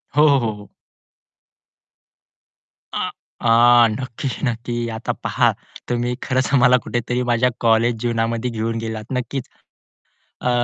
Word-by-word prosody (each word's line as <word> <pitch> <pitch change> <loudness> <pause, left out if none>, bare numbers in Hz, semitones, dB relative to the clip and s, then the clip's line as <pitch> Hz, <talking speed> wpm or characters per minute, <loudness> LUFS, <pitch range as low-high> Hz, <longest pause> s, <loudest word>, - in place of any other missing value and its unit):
हो, 150 - +5
हो, 140 -2 +5
हो, 115 -2 -1
हो. 105 -1 -14 2.2
आ, - - -2 0.3
आ, 120 0 +6
नक्की, 125 +3 -4 0.2
नक्की 120 0 -2
आता - - -3
पहा, - - +2 0.4
तुम्ही 120 0 -1
खरंच 130 +1 0
मला 125 0 +6
कुठेतरी 120 +1 -2
माझ्या 120 +2 +3
कॉलेज 115 +1 +3
जीवनामध्ये 115 0 -1
घेऊन 115 0 -2
गेलात. 110 -1 -4
नक्कीच. 125 0 -3 0.9
अ, - - 0
120 Hz, 120 wpm, -21 LUFS, 115-125 Hz, 2.2 s, आ